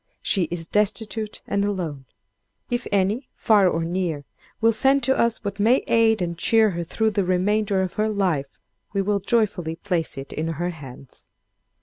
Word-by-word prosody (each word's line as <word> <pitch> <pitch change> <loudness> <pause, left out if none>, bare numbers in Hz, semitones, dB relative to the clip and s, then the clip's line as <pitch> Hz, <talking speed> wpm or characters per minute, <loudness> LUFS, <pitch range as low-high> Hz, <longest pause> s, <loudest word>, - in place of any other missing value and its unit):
She 190 -4 +2
is 165 0 -4
destitute 210 +2 -1
and 200 0 0
alone. 170 -9 -3 0.7
If 240 0 -1
any, 205 +6 0
far 205 -5 +4
or 165 -1 -1
near, 170 -4 -2 0.3
will 230 0 +4
send 270 +4 +3
to 265 +2 +2
us 235 -1 +1
what 200 -1 -4
may 230 +6 +3
aid 225 -3 +3
and 170 -1 -3
cheer 220 +4 +3
her 170 -1 -3
through 220 +6 0
the 200 -1 0
remainder 195 +2 +1
of 185 - -4
her 215 - +1
life, 180 -10 -1 0.3
we 195 -1 +1
will 205 +1 +1
joyfully 195 -6 0
place 170 -5 -2
it 135 0 -7
in 160 +1 -2
her 175 +3 -2
hands. 135 -4 -10
195 Hz, 170 wpm, -23 LUFS, 170-220 Hz, 0.7 s, far